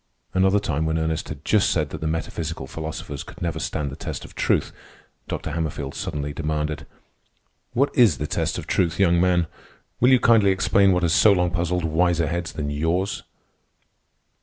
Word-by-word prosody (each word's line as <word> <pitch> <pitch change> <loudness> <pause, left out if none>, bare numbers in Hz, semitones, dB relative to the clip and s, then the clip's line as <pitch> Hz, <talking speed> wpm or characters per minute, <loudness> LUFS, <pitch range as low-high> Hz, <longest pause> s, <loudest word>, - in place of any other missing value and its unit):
Another 95 +2 +3
time, 80 -5 -1
when 80 0 0
Ernest 80 0 -2
had 75 -1 -8
just 105 -3 +3
said 75 -4 0
that - - -6
the 80 - -1
metaphysical 80 -2 -3
philosophers 80 -2 -6
could - - -11
never 85 -2 -2
stand 75 -2 -3
the - - -7
test - - -6
of - - -13
truth, - - +1 0.6
Dr. - - -4
Hammerfield 75 -3 -3
suddenly 75 0 -4
demanded: 75 -1 -3 0.9
"What 140 +4 +1
is 110 - +5
the 75 - -3
test - - -1
of - - -5
truth, 85 -2 0
young 85 -3 +4
man? 90 -2 +3 0.5
Will 125 - +5
you 130 -1 +6
kindly 115 -5 +5
explain 95 +1 +3
what 90 -1 +1
has 85 -1 +2
so 105 - +6
long 90 -3 +2
puzzled 85 0 -1
wiser 85 +1 +2
heads 85 +1 -3
than 75 -2 -3
yours?" 85 +6 -1
85 Hz, 180 wpm, -23 LUFS, 75-90 Hz, 0.9 s, you